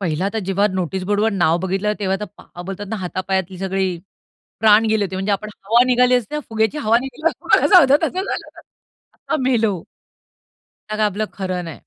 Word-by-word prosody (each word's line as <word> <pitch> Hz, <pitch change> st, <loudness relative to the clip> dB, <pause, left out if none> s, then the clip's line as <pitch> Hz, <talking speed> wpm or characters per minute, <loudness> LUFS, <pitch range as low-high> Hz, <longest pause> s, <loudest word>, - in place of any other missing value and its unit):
पहिला 180 Hz, +1 st, -1 dB
तर 225 Hz, -, -2 dB
जेव्हा 195 Hz, +1 st, +2 dB
नोटीस 185 Hz, 0 st, -3 dB
बोर्डवर 205 Hz, +3 st, +1 dB
नाव 170 Hz, -3 st, +2 dB
बघितलं, 195 Hz, +3 st, 0 dB
तेव्हा 190 Hz, -1 st, 0 dB
तर -, -, -2 dB
पा 175 Hz, -, -12 dB
बोलतात 195 Hz, +3 st, -6 dB
ना 220 Hz, -, -2 dB
हातापायातली 185 Hz, 0 st, -3 dB
सगळी 190 Hz, 0 st, -1 dB, 0.7 s
प्राण 220 Hz, 0 st, +6 dB
गेले 215 Hz, -2 st, +2 dB
होते 190 Hz, -1 st, -5 dB
म्हणजे 195 Hz, +2 st, -1 dB
आपण 205 Hz, +2 st, -2 dB, 0.2 s
हवा 235 Hz, +4 st, +4 dB
निघाली 250 Hz, 0 st, +4 dB
असते 245 Hz, +2 st, -1 dB
ना 300 Hz, -, -1 dB
फुग्याची 220 Hz, +6 st, 0 dB
हवा 225 Hz, -2 st, +3 dB
निघाल्यावर 270 Hz, +5 st, +1 dB
झालं 290 Hz, -8 st, +7 dB
तसं 370 Hz, -, -3 dB
झालं. 390 Hz, -, -4 dB, 0.7 s
आता -, -, -3 dB
मेलो. 225 Hz, -8 st, +1 dB, 1.1 s
त्यात 215 Hz, 0 st, -4 dB
आपलं 210 Hz, +2 st, -3 dB
खरं 185 Hz, -2 st, -3 dB
नाही. 165 Hz, -3 st, -8 dB
205 Hz, 175 wpm, -20 LUFS, 190-225 Hz, 1.1 s, झालं